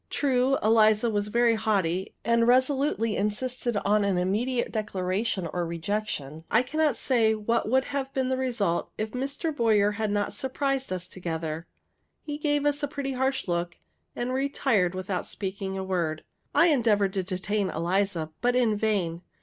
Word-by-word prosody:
True, 265 -1 +2
Eliza 220 +1 +4
was 205 -1 -1
very 235 +2 +3
haughty, 195 -5 0
and 235 0 +3
resolutely 260 -3 +2
insisted 240 +3 -1
on 210 +1 +3
an 200 -2 +1
immediate 225 +8 0
declaration 195 -2 -1
or 175 - -1
rejection; 170 -1 -3
and 160 +1 -11
I 225 +3 +4
cannot 300 -1 +1
say 225 -4 +2
what 215 +1 0
would 260 +2 +3
have 275 -1 -3
been 260 -1 -1
the 260 - +1
result 235 -9 0
if 215 0 -3
Mr. 280 +5 -3
Boyer 215 -5 +3
had 215 +1 -2
not 205 0 -1
surprised 270 -1 -2
us 185 -1 -3
together. 165 -3 -4 0.6
He 295 -1 -5
gave 290 -1 +1
us 290 0 +1
a 290 - 0
pretty 280 -1 -4
harsh 265 -1 -1
look, 175 0 -2 0.4
and 245 +1 -2
retired 260 -9 +1
without 185 0 -3
speaking 195 -1 -4
a 190 - -3
word. 170 -5 -2 0.3
I 340 - +6
endeavored 215 -8 +2
to 195 - 0
detain 190 +2 -2
Eliza, 170 -1 -1
but 245 0 +2
in 235 -4 +3
vain. 195 -6 0
215 Hz, 165 wpm, -27 LUFS, 190-255 Hz, 0.6 s, I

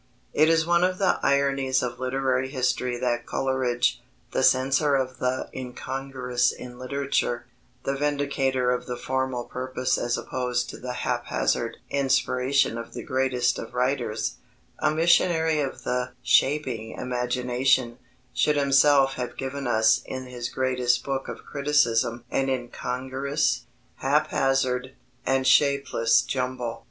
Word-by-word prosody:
It 155 +1 +4
is 165 -1 +3
one 175 +1 +3
of 185 0 +1
the 190 -2 +2
ironies 135 -2 +2
of 120 -1 -4
literary 130 0 0
history 125 -2 -1
that 120 -1 -1
Coleridge, 125 -2 0 0.3
the - - 0
censor 135 +3 +3
of 130 -1 -2
the 125 +1 -1
incongruous 130 -1 -2
in 125 0 -10
literature, 130 -2 -1 0.4
the 135 - -1
vindicator 140 -3 0
of 125 0 -2
the 125 -1 -4
formal 130 -1 -2
purpose 130 +1 -2
as 120 0 0
opposed 125 -1 -2
to - - -10
the 125 0 -5
haphazard - - -1
inspiration 135 -2 +1
of 115 - -9
the - - -5
greatest 130 -3 0
of 115 +2 -8
writers, 125 -3 -1 0.4
a - - +2
missionary 160 0 +3
of 140 -2 -3
the 125 0 -2
"shaping 130 -6 +1
imagination," 125 0 0 0.3
should 150 - +2
himself 140 -1 +4
have 125 -2 -5
given 135 0 -4
us 110 -2 +4
in 130 0 -5
his 125 -1 -5
greatest 125 -1 +1
book 135 -1 -3
of - - -8
criticism 120 -5 +1
an 135 0 +1
incongruous, 130 +2 -2 0.3
haphazard, 130 -1 +1 0.3
and 135 0 +2
shapeless 140 -5 +3
jumble. 125 -2 -3
130 Hz, 130 wpm, -25 LUFS, 125-135 Hz, 0.4 s, It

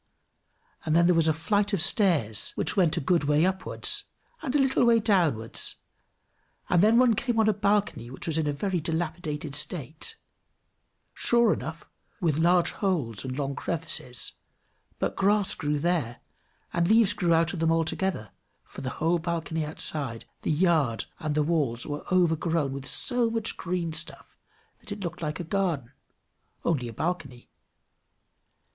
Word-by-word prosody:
And 155 0 0
then 170 0 +5
there 180 - +5
was 165 -1 +3
a - - +5
flight 205 +6 0
of 200 - +1
stairs 160 - +2
which - - +1
went 175 -5 +2
a - - +2
good 165 +1 +1
way 150 +3 +3
upwards, 190 0 -1 0.4
and 280 -3 -3
a - - +6
little 265 -2 +2
way 235 -1 +5
downwards, 170 - +1 1.0
and 175 -1 +5
then 220 +3 +5
one 250 -2 +5
came 235 +2 -1
on 220 - +4
a 215 - +4
balcony 200 - 0
which 130 - -8
was 160 -1 0
in 155 - 0
a - - +1
very 180 +5 -1
dilapidated 160 -2 -3
state, 155 0 -2 1.0
sure 235 -2 +3
enough, 160 +5 -7 0.3
with 160 -4 +1
large 175 +1 +3
holes 145 - -1
and 130 0 -5
long 140 -1 -2
crevices, 155 -7 -4 0.6
but - - -2
grass 200 0 +2
grew 150 -1 -1
there 145 -7 -1 0.5
and 170 0 +1
leaves 220 0 +4
out 165 -1 +3
of 180 - -4
them 165 0 +2
altogether, 165 - -1 0.3
for - - -11
the 130 - -3
whole 170 +2 +1
balcony 160 -1 -2
outside, 145 -5 -3 0.2
the - - -3
yard, 155 -8 +2
and 155 -1 -2
the 150 - +2
walls, 145 -7 0
were 145 0 -5
overgrown 165 -5 +1
with 140 0 -6
so 245 -2 +3
much 225 -1 0
green 170 -2 -3
stuff, - - -3 0.4
that - - -14
it 205 0 -5
looked 175 -1 -5
like 150 0 -3
a - - -3
garden; 170 -8 -1 0.7
only 140 -8 0
a - - -6
balcony. 140 - -4
165 Hz, 160 wpm, -27 LUFS, 150-190 Hz, 1.0 s, a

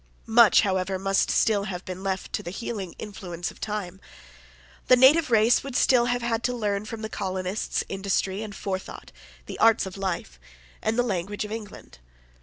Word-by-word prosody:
Much, 225 -1 +6
however, 190 -1 0
must 195 +1 +1
still 205 -3 +2
have 185 -2 -6
been 185 0 -6
left 190 -1 -3
to - - -1
the 170 - -7
healing 195 -2 -5
influence 180 -5 -6
of - - -18
time. 200 -3 -4 0.9
The 255 - +7
native 270 +5 +6
race 225 +1 +4
would 275 -2 -7
still 250 -2 +4
have 245 0 -1
had 230 -1 0
to 250 0 0
learn 210 -3 -1
from 220 0 -7
the - - -2
colonists 190 -1 -3
industry 195 0 -1
and 210 -2 -7
forethought, 190 -1 -6 0.3
the - - -8
arts 225 -1 +4
of 190 0 -8
life, 175 - -4 0.4
and 220 +1 -1
the 245 - +3
language 205 -1 -3
of 210 - -9
England. 215 - -9
205 Hz, 180 wpm, -25 LUFS, 190-225 Hz, 0.9 s, The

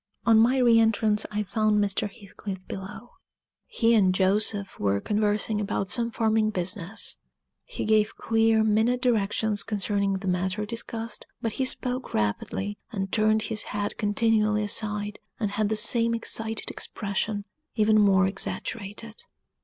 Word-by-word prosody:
On 225 -2 +6
my 245 +4 +4
re 240 -3 +5
entrance 220 -1 +2
I 210 0 -2
found 215 +1 +1
Mr. 205 0 0
Heathcliff 195 -2 -9
below. 210 +5 -8 0.6
He 230 -1 +2
and 190 -5 +4
Joseph 200 +1 +1
were 100 0 +1
conversing 210 - 0
about 195 -2 -1
some 230 +4 +2
farming 220 -1 +1
business; 190 +1 -4 0.5
he - - -5
gave 215 0 +2
clear, 225 -1 +2
minute 220 +3 +2
directions 220 -3 +1
concerning 200 -1 -1
the 190 0 -4
matter 185 +3 -1
discussed, 230 +1 -4
but 225 - -2
he 260 +5 -1
spoke 255 0 +1
rapidly, 150 - -2
and 195 -4 -3
turned 215 0 +2
his 220 -2 -3
head 205 0 -2
continually 215 0 +2
aside, 210 0 0 0.2
and 210 -3 -1
had 205 0 0
the 220 - 0
same 230 +2 +3
excited 225 -1 -1
expression, 205 0 -3 0.3
even 215 -1 +4
more 195 -2 +4
exaggerated. 205 +3 -4
210 Hz, 140 wpm, -26 LUFS, 200-225 Hz, 0.6 s, On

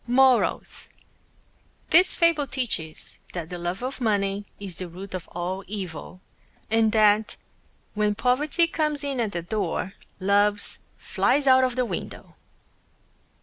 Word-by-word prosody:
MORALS: 255 0 +2 1.0
This 360 +3 +6
Fable 335 -4 +3
teaches 235 - -5
that 170 -2 -5
the 175 - -5
Love 175 +6 -3
of 260 +1 -4
Money 205 -2 0
is 195 -4 -5
the 185 - -4
Root 185 +3 -9
of 185 -2 -5
All 180 +3 -4
Evil, 185 -3 -7 0.5
and 225 -1 +3
that 215 -1 +4 0.6
When 210 -1 +1
Poverty 275 +8 +2
Comes 305 -3 -1
In 275 -3 -2
At 225 -3 0
the 170 - -3
Door, 195 0 -2 0.3
Loves 205 +1 +2 0.2
Flies 285 0 +1
Out 260 -1 +6
Of 255 -2 0
the 255 -1 +1
Window. - - -6
210 Hz, 135 wpm, -25 LUFS, 190-260 Hz, 1.0 s, This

